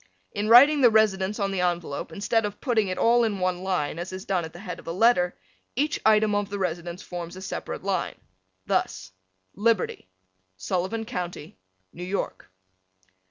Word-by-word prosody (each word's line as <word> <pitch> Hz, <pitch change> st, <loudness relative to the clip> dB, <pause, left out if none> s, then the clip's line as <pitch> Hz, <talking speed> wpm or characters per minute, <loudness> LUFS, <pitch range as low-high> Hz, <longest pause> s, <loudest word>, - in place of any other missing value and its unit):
In 210 Hz, +1 st, -2 dB
writing 280 Hz, +5 st, +8 dB
the 245 Hz, -, +8 dB
residence 210 Hz, -2 st, +2 dB
on 200 Hz, -1 st, 0 dB
the 190 Hz, -2 st, -1 dB
envelope, 175 Hz, -4 st, -2 dB
instead 215 Hz, +6 st, 0 dB
of 205 Hz, 0 st, -4 dB
putting 230 Hz, -6 st, +1 dB
it 185 Hz, -, -3 dB
all 235 Hz, +1 st, +4 dB
in 215 Hz, -3 st, 0 dB
one 180 Hz, -1 st, -1 dB
line 180 Hz, -5 st, -1 dB
as 175 Hz, +2 st, -5 dB
is 185 Hz, +2 st, -7 dB
done 190 Hz, -5 st, 0 dB
at 160 Hz, -, -7 dB
the -, -, -12 dB
head 180 Hz, -2 st, -7 dB
of -, -, -15 dB
a -, -, -2 dB
letter, 180 Hz, -2 st, +3 dB, 0.4 s
each 295 Hz, +5 st, 0 dB
item 215 Hz, -1 st, +4 dB
of 205 Hz, -1 st, 0 dB
the 205 Hz, -, -4 dB
residence 175 Hz, 0 st, -3 dB
forms 175 Hz, -1 st, -7 dB
a -, -, -8 dB
separate -, -, -5 dB
line. -, -, -1 dB, 0.5 s
Thus, 95 Hz, 0 st, -1 dB, 0.4 s
Liberty, 210 Hz, -, 0 dB, 0.5 s
Sullivan 185 Hz, -, -2 dB
County, 175 Hz, -, -6 dB, 0.3 s
New 175 Hz, -, -8 dB
York. 185 Hz, -, -4 dB
190 Hz, 175 wpm, -26 LUFS, 175-220 Hz, 0.5 s, writing